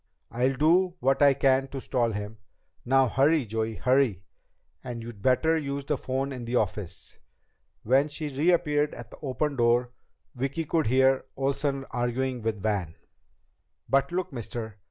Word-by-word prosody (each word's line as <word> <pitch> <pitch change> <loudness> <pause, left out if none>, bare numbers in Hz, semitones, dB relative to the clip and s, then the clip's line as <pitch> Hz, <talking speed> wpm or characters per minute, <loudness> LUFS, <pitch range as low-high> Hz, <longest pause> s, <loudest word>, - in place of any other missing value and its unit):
I'll 130 +3 +1
do 175 +6 +3
what 135 0 +1
I 140 -1 +6
can 135 0 +2
to 135 0 -6
stall 120 -3 0
him. 105 +1 -6 0.5
Now 135 +1 +4
hurry, 140 +3 +3
Joey! 110 +1 -2
Hurry! 125 -3 +2 0.6
And 120 -2 -6
you'd 115 -4 -9
better 135 +8 +3
use 140 -1 -4
the 150 - 0
phone 135 +1 -2
in 125 -2 -6
the 120 +1 -3
office." 95 -7 -2 0.6
When 135 +6 +3
she 145 -1 -5
reappeared 150 -1 +2
at 120 -1 -10
the - - -13
open 145 0 -2
door, 120 +1 +2 0.4
Vicki 135 +5 -3
could 160 -2 0
hear 130 +2 +3
Roy 135 - -2
Olsen 140 0 -1
arguing 125 +1 -1
with 110 -2 -3
Van. 100 -7 -1 0.9
"But 135 +2 +2
look, 180 -2 -2
mister! 110 -3 -6
130 Hz, 155 wpm, -27 LUFS, 120-140 Hz, 0.9 s, I